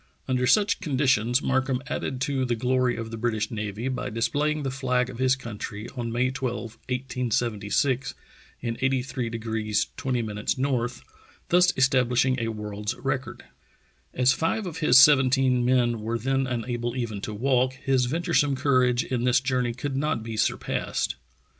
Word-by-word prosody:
Under 125 -1 +1
such 210 - +3
conditions 130 - +1
Markham 130 -1 +1
added 130 -2 -4
to 135 -1 0
the 120 -2 0
glory 125 +1 +1
of 115 -1 -6
the 115 - -5
British 110 -2 -1
Navy 105 +1 -4
by 130 -1 -3
displaying 145 +7 0
the 135 - -2
flag 125 -2 0
of 120 - -10
his 130 0 +3
country 105 -4 -7
on 120 -3 -5
May 125 +2 +1
12, 120 -4 -4
1876, 125 0 -1 0.5
in 115 -1 -3
83° 115 -5 -1
20' 130 -2 -1
N., 125 +5 -1 0.7
thus 180 0 +5
establishing 130 -1 +3
a 115 - -1
world's 105 -1 -4
record. - - -4 0.7
As 125 +1 +3
five 165 +9 -1
of 170 -4 -6
his 150 -4 +5
seventeen 130 -2 +5
men 120 -2 +2
were 115 +2 -2
then 135 +3 0
unable 120 0 -3
even 115 -5 -3
to 110 - -5
walk, 130 +2 +2
his 130 -1 0
venturesome 160 -1 +1
courage 130 -2 +2
in 125 -2 -2
this 125 +1 +4
journey 130 -2 -1
could 135 +1 -4
not 140 -5 -1
be 115 0 -5
surpassed. 105 - -1
125 Hz, 150 wpm, -26 LUFS, 115-135 Hz, 0.7 s, thus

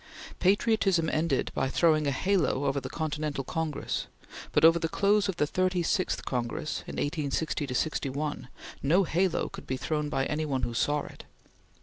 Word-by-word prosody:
Patriotism 195 -4 +2
ended 155 -3 0
by 135 - 0
throwing 155 -1 +3
a - - +2
halo 150 -3 +1
over 140 0 0
the - - -6
Continental 150 -3 -3
Congress, 160 +2 -3 0.4
but - - +4
over 165 +1 +7
the 165 - -1
close 205 +2 +2
of 190 - -1
the 150 - +2
Thirty 185 +2 0
sixth 185 +2 0
Congress 125 +4 -2
in - - -6
1860 145 -1 -2
61, 145 +1 -2 0.3
no 170 +8 +4
halo 180 +1 +1
could - - -10
be 130 - -2
thrown 150 +2 -2
by 135 -2 0
any 150 +2 -1
one 135 -4 -1
who 120 - -1
saw 145 +5 +1
it. - - -11
155 Hz, 165 wpm, -28 LUFS, 140-175 Hz, 0.4 s, over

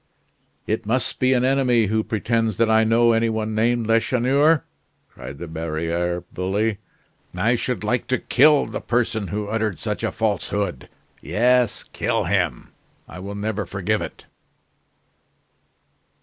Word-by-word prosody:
"It 110 0 -2
must 130 +3 0
be 130 0 +3
an 125 0 +2
enemy 130 -4 +3
who 110 +2 0
pretends 115 -1 -1
that 115 -1 +3
I 110 0 +5
know 115 +1 +4
any 115 0 +2
one 110 0 -2
named 115 +2 +1
Lacheneur!" 130 +6 +3 0.4
cried 70 - -10
the 85 - -7
barriere 85 +2 -2
bully. 100 +3 -1 0.6
"I 115 +3 +2
should 125 -1 -2
like 120 +3 -1
to 130 - +1
kill 145 +4 +4
the - - -5
person 115 -4 -1
who 105 +1 -3
uttered 110 -3 -1
such - - -4
a - - 0
falsehood. 100 -7 -2 0.3
Yes, 120 - +2
kill - - 0
him; 90 -8 -1 0.4
I 90 - -10
will 100 +2 -6
never 105 0 -2
forgive - - -1
it." - - -8
110 Hz, 140 wpm, -22 LUFS, 100-120 Hz, 0.6 s, I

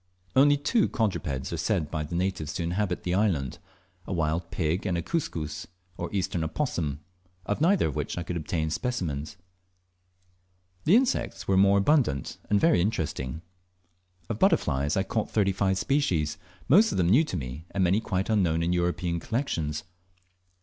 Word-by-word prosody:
Only 145 +2 +6
two 200 +10 +2
quadrupeds 85 - -2
are - - -2
said 85 -3 -1
by 80 - -2
the 75 +3 -5
natives 90 -3 -1
to 85 - -3
inhabit 90 +2 -1
the 90 - -1
island 90 - 0 0.5
a - - -3
wild 85 0 -1
pig 85 +3 -1
and 90 -2 0
a 85 - -2
Cuscus, 80 - -3 0.3
or 85 - -4
Eastern 90 -4 -1
opossum, 80 - -2 0.4
of 105 +8 -2
neither 185 +4 +4
of 75 - -4
which - - -3
could 85 0 -4
I - - -1
obtain 80 0 -2
specimens. 85 - -3 1.5
The 180 - +6
insects 240 - +1
were 95 - +3
more 100 +1 +5
abundant, 100 - +1
and 105 - +4
very 165 - +4
interesting. 80 - -2 0.8
Of - - -4
butterflies 70 +5 +2
I 95 - +2
caught 105 +2 -2
thirty 100 -3 +2
five 95 0 +1
species, 90 - 0 0.3
most 205 +10 +6
of - - -2
them 90 -2 +2
new 125 - +6
to 95 - -4
me, 70 +4 -6
and 95 -1 0
many 95 +5 +3
quite 95 -3 -1
unknown 85 -7 +2
in 85 +1 +1
European 85 -1 0
collections. 80 - -2
90 Hz, 165 wpm, -27 LUFS, 80-105 Hz, 1.5 s, Only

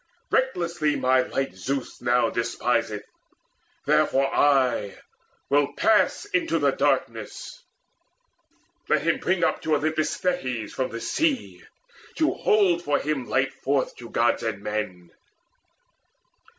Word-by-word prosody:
Recklessly 170 - 0
My 130 0 +3
light 135 -2 -3
Zeus 130 +9 -4
now 120 -2 +2
despiseth! 115 -2 -1 0.8
Therefore 135 0 +2
I 130 -8 +2 0.5
Will 145 0 +2
pass 220 - +2
into 335 -5 0
the - - +2
darkness. - - -2 1.3
Let - - +2
him - - +1
bring 185 -1 0
Up - - +1
to 155 -1 +1
Olympus 155 +1 -1
Thetis 130 -11 -2
from 130 - -2
the 115 - -6
sea 310 -5 -1 0.5
To 315 -1 +2
hold 190 -5 +2
for 145 -2 +1
him 140 -4 -2
light 135 +1 +1
forth 135 0 -1
to 120 -1 -10
Gods 120 +1 +1
and 110 -3 -3
men! 105 -5 -4
135 Hz, 120 wpm, -25 LUFS, 120-170 Hz, 1.3 s, My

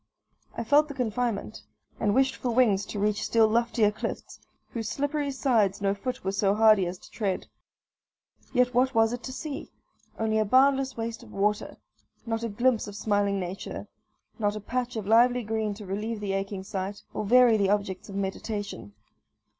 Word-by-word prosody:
I 235 - -1
felt 290 +6 +4
the 285 - -8
confinement, 240 -3 -2 0.4
and 205 0 +1
wished 265 0 +3
for 250 - -3
wings 225 -5 +3
to - - -6
reach 210 +1 0
still 225 -1 +4
loftier 230 -1 +2
cliffs, 210 - -6 0.3
whose 225 -2 -4
slippery 285 +1 -1
sides 235 -8 +1
no 200 -1 +1
foot 250 +5 -5
was 195 +1 -2
so 200 -2 +3
hardy 215 -4 +5
as 180 +1 -5
to - - -17
tread. 200 -4 -2 1.1
Yet 250 -1 +2
what 255 +1 +2
was 225 +1 +4
it 245 - -4
to 260 - -6
see? 285 +2 -6 0.5
only 220 -1 +1
a - - +4
boundless 265 +3 +3
waste 230 +1 -4
of 230 -3 -14
water 210 +1 -1 0.5
not 225 -1 -2
a 230 - -1
glimpse 235 +2 +1
of 205 - -8
smiling 205 -1 +1
nature 185 +1 -6 0.5
not 205 -1 +1
a - - -4
patch 245 +3 -3
of 220 -3 -3
lively 240 +3 +4
green 215 -1 -2
to 210 0 -10
relieve 210 +4 -3
the 200 -2 -2
aching 195 0 -3
sight, 195 +1 -5
or - - -2
vary 240 +2 +6
the 200 -2 +2
objects 200 -2 -1
of 195 - -7
meditation. 200 - -4
220 Hz, 180 wpm, -27 LUFS, 200-245 Hz, 1.1 s, vary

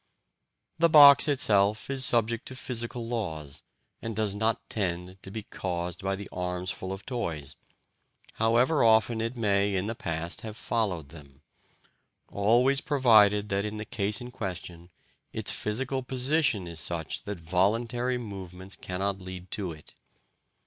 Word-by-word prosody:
The 170 0 +5
box 145 -3 +9
itself 105 -7 +2
is 135 -1 0
subject 115 -1 +1
to 130 - -4
physical 120 -2 -3
laws, 80 - -4 0.4
and 115 -1 -5
does 105 -2 +1
not 110 +2 -1
tend 90 -2 -3
to - - -9
be 110 +2 -6
caused 90 -3 -4
by 95 0 0
the 100 +1 -8
arms 90 0 -3
full 95 - -6
of 95 0 -7
toys, 80 - -4 0.8
however 120 +7 +3
often 110 0 +4
it 115 +2 -3
may 100 -2 +1
in 95 +1 -1
the 110 - -2
past 85 -5 -3
have 110 -1 -8
followed 95 - -2
them 70 -3 -15 0.9
always 120 +7 +3
provided 105 -7 +4
that, 100 0 0
in 105 0 -4
the 105 - -5
case 105 -2 +1
in 125 0 -8
question, 90 -6 -6 0.4
its - - -1
physical 130 +5 -2
position 130 - +1
is 85 -2 -6
such 80 -1 -4
that 100 -3 -5
voluntary 115 +9 0
movements 95 -4 -7
cannot 95 +1 -3
lead 95 0 -9
to 100 -5 -3
it. 75 -2 -14
105 Hz, 150 wpm, -28 LUFS, 90-120 Hz, 0.9 s, box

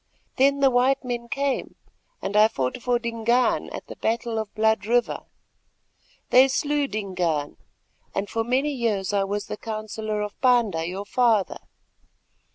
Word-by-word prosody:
Then 280 +1 +3
the 270 -1 +5
white 255 +3 +2
men 240 -1 -3
came, 275 0 -2 0.5
and 200 - -3
I 210 +1 +7
fought 135 - -3
for 245 0 +1
Dingaan 235 +1 +1
at - - -7
the - - -10
battle 225 0 -1
of 220 - -3
the - - -45
Blood 220 -1 +2
River. 240 +1 +1 1.1
They 255 +2 +7
slew 290 +1 0
Dingaan, 180 - -2 0.6
and 195 +1 -1
for 225 +2 -1
many 260 +5 +1
years 215 -7 -1
I 200 -1 +2
was 205 +1 -3
the - - -6
counsellor 215 -1 -4
of 210 0 -8
Panda, 230 -10 +3
your 190 +3 -5
father. 225 -3 +2
225 Hz, 155 wpm, -24 LUFS, 205-250 Hz, 1.1 s, I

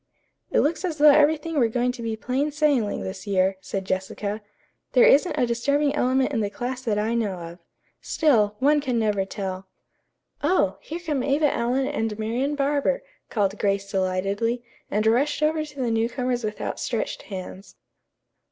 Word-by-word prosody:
"It - - +3
looks 330 +6 0
as 340 -4 -2
though 300 0 +8
everything 305 +1 +3
were 235 - +4
going 245 +2 0
to 250 -1 -9
be 225 -1 -2
plain 260 +6 -1
sailing 285 -8 +1
this 190 +2 -7
year," 190 -1 +2
said 190 +1 -4
Jessica. 195 +3 -3 0.5
"There 250 - +6
isn't 300 +4 +4
a 255 - +3
disturbing 280 +5 +1
element 260 0 +1
in 230 - +1
the 205 -2 0
class 250 +4 -4
that 225 -5 -1
I 215 +2 0
know 225 -4 0
of. 170 0 -9 0.4
Still, 220 -10 +2
one 290 +5 +3
can 255 -4 -1
never 210 -3 +1
tell." 190 -1 -5 0.7
"Oh, 200 - +1
here 320 - -6
come 290 -6 -1
Eva 290 +1 +2
Allen 250 +3 0
and 225 -7 -2
Marian 240 +7 -1
Barber," 290 - 0 0.3
called 200 -2 0
Grace 200 0 0
delightedly, 195 +5 -1 0.3
and 210 +1 0
rushed 275 +7 +2
over 310 0 +2
to 295 -2 -11
the 245 -3 0
newcomers 240 +2 -1
with 210 -1 -4
outstretched - - -3
hands. 190 0 -8
235 Hz, 170 wpm, -24 LUFS, 205-285 Hz, 0.7 s, though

